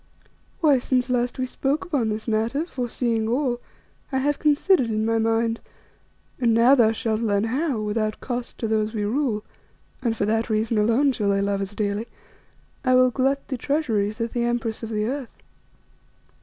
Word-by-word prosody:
Why, 290 -5 +5
since 250 0 0
last 245 0 0
we 255 - -1
spoke 275 +5 -1
upon 280 -11 0
this 215 +2 -4
matter, 230 +8 0
foreseeing 240 -6 -1
all, 245 0 0 0.5
I 265 - 0
have 290 +2 0
considered 300 -1 +3
in 215 -1 -1
my 225 0 +1
mind, 225 +1 +1 0.8
and 235 -3 +3
now 235 +4 +6
thou 235 -5 +5
shalt 225 0 -1
learn 205 -3 +1
how, 260 +2 -1
without 215 0 -1
cost 245 -1 -5
to 225 - -2
those 215 0 0
we 210 - -1
rule 225 -2 0 0.6
and 230 -3 -1
for 205 - +1
that 225 +2 0
reason 220 0 +1
alone 230 +7 +3
shall 210 -5 -1
they 200 0 +2
love 200 0 0
us 195 +1 -5
dearly 210 +2 -2 0.8
I 255 -1 +4
will 255 0 +5
glut 270 +2 0
the 260 - -2
treasuries 225 -8 0
of 230 0 -2
the 240 - -1
Empress 235 -2 -1
of 225 - -5
the 210 -1 -1
Earth. 265 +1 -5
230 Hz, 180 wpm, -24 LUFS, 220-260 Hz, 0.8 s, now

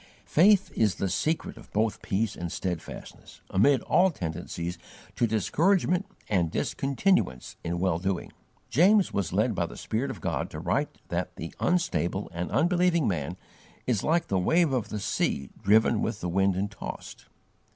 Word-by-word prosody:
Faith 195 +4 +4
is 105 -5 +2
the 95 - -1
secret 155 - -1
of 115 - -14
both 110 +1 0
peace 105 +2 -1
and 85 -1 -5
steadfastness, 90 -4 -6
amid 120 +7 +4
all 190 +2 +4
tendencies 85 - -5 0.4
to 120 - +2
discouragement 175 - +2 0.2
and 90 -5 +1
discontinuance 135 - 0
in 85 +1 -2
well 90 -2 +1
doing. 95 -1 -2 0.4
James 190 - +4
was 100 -3 -1
led - - +2
by - - -1
the - - -10
Spirit - - -2
of - - -6
God - - -2
to - - -7
write - - -1
that - - -3
the 80 - -7
unstable 95 - 0
and 85 +1 -3
unbelieving 175 -1 +2
man 85 -1 -2 0.5
is 115 -6 +1
like 165 +2 +2
the 95 - +1
"wave 160 - +3
of 125 -5 -1
the 105 - -3
sea 70 -7 -1
driven 110 +3 +4
with - - -2
the 90 - -3
wind 95 +1 +2
and 100 +3 -2
tossed." 110 - -8
105 Hz, 160 wpm, -27 LUFS, -, 0.5 s, Faith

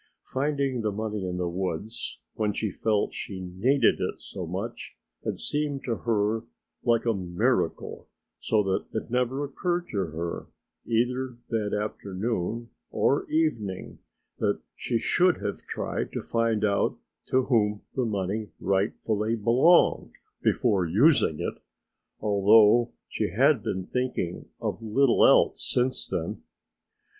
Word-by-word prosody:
Finding 140 -2 -1
the 110 -1 0
money 105 -1 -3
in 90 -1 -3
the 90 -1 -1
woods, 95 +4 -4
when 105 -2 0
she 105 0 -2
felt 105 +2 0
she 95 -2 -6
needed 95 +10 +2
it - - -2
so - - -7
much, - - -5 0.3
had - - -2
seemed 145 -2 -2
to 115 -3 -1
her 110 -1 0 0.4
like 115 -1 +2
a 115 - +3
miracle, 90 -3 -1 0.3
so 110 -2 +2
that 95 -1 -1
it 110 +1 -4
never 125 +3 0
occurred 175 +5 -2
to 105 - -3
her, 85 +2 -5 0.4
either 125 +2 0
that 105 -3 -1
afternoon 105 +2 -3 0.2
or 140 - +1
evening, 115 - -1 0.4
that - - +1 0.2
she 120 - -1
should 180 +10 +3
have 100 - -4
tried - - -3
to - - -2
find 115 -2 +1
out 100 -1 +1 0.3
to 130 0 +2
whom 105 -5 +1
the 130 - 0
money 105 -1 -2
rightfully 105 +3 0
belonged 120 +11 +4 0.3
before 100 -6 +2
using 95 - +3
it, - - -4 0.6
although 105 +3 +5 0.2
she - - -2
had - - +3
been 95 -1 -3
thinking 125 -9 -2
of - - -3
little 120 +4 +3
else - - +5
since 125 +1 0
then. - - -3
110 Hz, 130 wpm, -27 LUFS, 100-125 Hz, 0.6 s, although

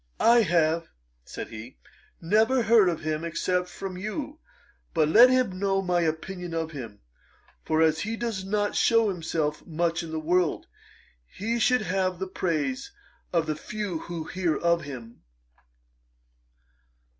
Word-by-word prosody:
'I 235 +1 +6
have 165 -3 +2 0.4
(said - - -7
he) 115 +3 -10 0.4
never 220 +8 +3
heard 220 -5 +5
of 170 - -3
him 155 0 -2
except 180 +2 -1
from 190 -2 -6
you; 285 +9 -5 0.6
but 155 -2 +3
let 235 +11 +8
him 255 -8 +1
know 195 -1 +1
my 180 -1 +1
opinion 170 +2 -3
of 160 -1 -2
him: 115 -8 -8 0.6
for 160 0 +2
as 160 0 +3
he 220 +6 -3
does 225 -5 -3
not 205 +1 -1
shew 230 -2 +4
himself 160 -4 -2
much 170 +1 0
in 165 - -7
the 160 0 -3
world, 175 +1 +1 0.6
he 230 - -3
should 250 0 +3
have 185 -1 0
the 190 - -3
praise 190 - -2 0.4
of 165 -2 +1
the 155 -1 -2
few 200 0 -4
who 170 -1 -6
hear 170 0 -1
of 170 0 +2
him.' 120 -5 -9
180 Hz, 145 wpm, -26 LUFS, 160-210 Hz, 0.6 s, let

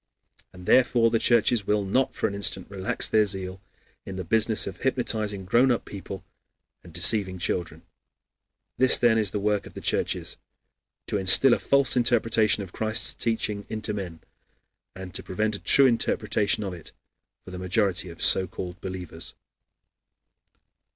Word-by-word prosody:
And 90 -1 -13
therefore 120 -1 +3
the 115 - +1
churches 115 -2 +2
will 105 -1 +1
not 130 +7 0
for - - -2
an - - -6
instant 100 -1 -2
relax 95 -1 -3
their 110 -1 +2
zeal 95 -1 -4 0.4
in 95 - -8
the 95 - -5
business 110 +4 +1
of 95 - -7
hypnotizing 110 -7 -2
grown 120 +7 +3
up 120 - -1
people 95 -1 -9 0.6
and 85 - -14
deceiving 95 +2 +2
children. 85 0 -3 1.0
This, 130 -1 +4
then, 115 -2 +3
is 105 -3 +1
the 105 - -3
work 105 0 -1
of - - -14
the - - -8
churches: - - -2 0.7
to 105 - -2
instill 95 +7 +6
a - - 0
false 140 -1 +2
interpretation 115 -3 +2
of 90 - -12
Christ's 110 +1 +2
teaching 105 -3 -3
into 110 -1 -2
men, 90 -6 -7 0.7
and 95 -1 -9
to - - -4
prevent 110 +3 -2
a - - -8
true 140 - +4
interpretation 110 -3 0
of 95 -2 -5
it 85 - -12 0.5
for - - -10
the 90 - -7
majority 95 -1 -1
of 85 - -7
so 95 - +5
called 90 0 -8
believers. 90 -3 -8
100 Hz, 160 wpm, -25 LUFS, 95-115 Hz, 1.0 s, instill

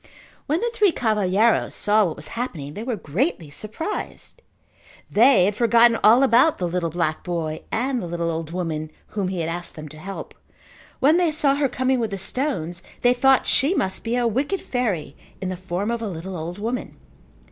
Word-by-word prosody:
When 310 +4 +1
the 475 0 0
three 420 -5 +4
cavalheiros 215 - +2
saw 210 +1 +3
what 165 - -3
was 150 +1 -8
happening 165 - -5
they 210 - -6
were 240 0 -2
greatly 175 - -2
surprised. 215 - -6 0.7
They 225 -4 +6
had 200 +1 0
forgotten 235 0 +4
all 235 +5 +7
about 265 +5 +4
the 180 - -1
little 170 -1 -1
black 160 -1 -2
boy 165 -3 -3
and 250 +2 0
the 175 - -5
little 170 0 -2
old 160 -1 -4
woman 165 -3 -3 0.2
whom 200 -3 -2
he 185 -2 -2
had 160 - -2
asked 175 +1 -5
them 155 -1 -8
to 155 +1 -12
help. 195 +4 -7 0.7
When 300 +6 +5
they 350 -3 +2
saw 295 -2 +2
her 280 -1 +1
coming 260 0 0
with 225 -2 -1
the 195 - -4
stones 180 - -3 0.2
they 245 0 +5
thought 265 +1 +4
that - - -12
she 290 +8 +3
must 190 - -1
be 230 +1 -1
a 245 -1 +1
wicked 275 - 0
fairy 205 - -2 0.2
in 190 - -3
the 185 - -3
form 185 +4 -3
of 235 -1 -2
a 225 - -2
little 185 +2 -6
old 170 +2 -5
woman. 230 +4 -4
210 Hz, 200 wpm, -23 LUFS, 175-250 Hz, 0.7 s, all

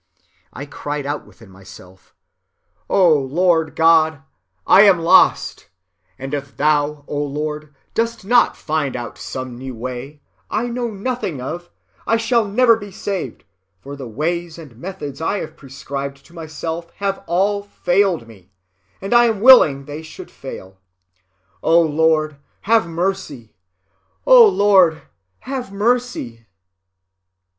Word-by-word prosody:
I 140 - -8
cried 145 0 -5
out 145 +1 -4
within 115 -4 -18
myself, 95 0 -16 0.7
O 180 -5 +4
Lord 160 +3 +1
God, 160 -3 +3 0.4
I 195 - +7
am 200 -3 +6
lost, 170 +3 +3 0.5
and 135 +2 -7
if 140 -1 -5
thou, 150 0 0
O 145 - -3
Lord, 150 +1 -5 0.2
dost 230 -2 -2
not 240 +3 +3
find 155 -3 -2
out 120 -1 -7
some 130 -2 -7
new 130 -1 -7
way, 130 +5 -7 0.3
I 215 +3 -1
know 240 0 -3
nothing 205 - -4
of, 175 +7 -6 0.4
I 230 - +3
shall 230 -1 +1
never 230 +3 +4
be 205 -2 -9
saved, 190 - -5 0.4
for 140 +7 -9
the 135 -3 -8
ways 165 +7 -3
and 150 -8 -12
methods 145 -1 -8
I 195 +5 -1
have 160 - -7
prescribed 140 0 -7
to 170 - -20
myself 165 +1 -6
have 195 -1 -3
all 200 +4 +1
failed 190 - 0
me, 95 -5 -17 0.5
and 195 +4 -3
I 240 0 +6
am 225 -3 0
willing 175 - +6
they 145 +2 -7
should 160 - -11
fail. 95 -8 -10 0.8
O 165 +1 +4
Lord, 155 -1 +1 0.2
have 225 -2 +2
mercy! 165 - -4 0.7
O - - +8
Lord, 195 - +3 0.4
have 260 -5 -5
mercy! 205 - -2
160 Hz, 135 wpm, -19 LUFS, 140-200 Hz, 0.8 s, O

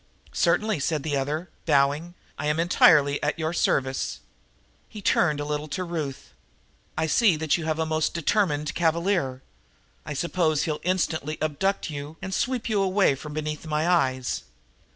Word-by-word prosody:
"Certainly," 215 -6 +2
said 150 +1 -1
the 150 -2 -1
other, 150 +6 -2 0.2
bowing. 145 +5 +2 0.2
"I - - -3
am 150 +2 +1
entirely 150 -4 +5
at - - -1
your 160 0 -2
service." 135 -5 0 0.7
He 215 - -9
turned 160 -6 +2
a 145 - -3
little 150 0 -3
to 185 +5 -3
Ruth. 155 -6 -5 0.6
"I 160 - +1
see 190 +3 +4
that 155 -1 +1
you 170 - -3
have 160 -1 0
a 160 - 0
most 160 0 0
determined 165 -3 +1
cavalier. 165 -6 0 0.6
I - - -6
suppose 160 0 +1
he'll 155 -3 -2
instantly 160 -4 -1
abduct 155 +5 -1
you 145 +2 -7
and 190 0 -5
sweep 250 +2 -1
you 210 -3 +1
away 195 -4 +3
from 150 +3 -8
beneath 155 +1 -4
my 155 +1 0
eyes?" 130 - +1
155 Hz, 160 wpm, -25 LUFS, 145-175 Hz, 0.7 s, entirely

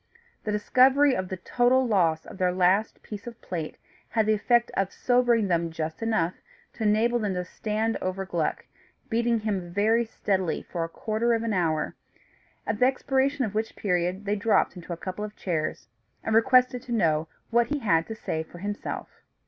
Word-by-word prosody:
The 215 - -1
discovery 260 +6 +4
of 185 -1 -3
the 190 - -4
total 250 +7 +2
loss 170 -7 +2
of - - -11
their 180 -1 +2
last 185 +4 +2
piece 210 +1 -8
of 235 -1 -8
plate 165 -4 -5 0.3
had 220 -2 +1
the 215 - +3
effect 240 +3 +2
of 195 -1 0
sobering 245 -4 +2
them 170 -2 +1
just 160 +1 -5
enough 215 -7 +1 0.4
to - - -12
enable 220 +3 +3
them 205 -4 -1
to 180 0 -2
stand 220 +3 -2
over 185 +1 -2
Gluck, 170 -4 -2 0.5
beating 235 0 +1
him 195 -5 -2
very 220 +5 +3
steadily 195 -5 -1
for 170 -2 -4
a 165 - -4
quarter 225 +6 0
of 225 - -2
an 225 -2 -1
hour; 165 -4 0 0.7
at 210 - -2
the 250 - +5
expiration 270 +1 +1
of 210 - -5
which 220 +1 -2
period 180 +1 -1
they 205 +1 +1
dropped 210 0 +2
into 175 0 -9
a 170 - -3
couple 185 +4 -5
of 210 0 -6
chairs, 160 -4 -3 0.4
and 220 - -1
requested 250 +1 +4
to 255 - -10
know 160 -8 +2 0.2
what 235 0 +3
he 295 - -1
had 165 - +2
to 220 - -5
say 160 -6 -3
for 160 +2 -11
himself. 205 +3 -5
210 Hz, 190 wpm, -26 LUFS, 180-235 Hz, 0.7 s, the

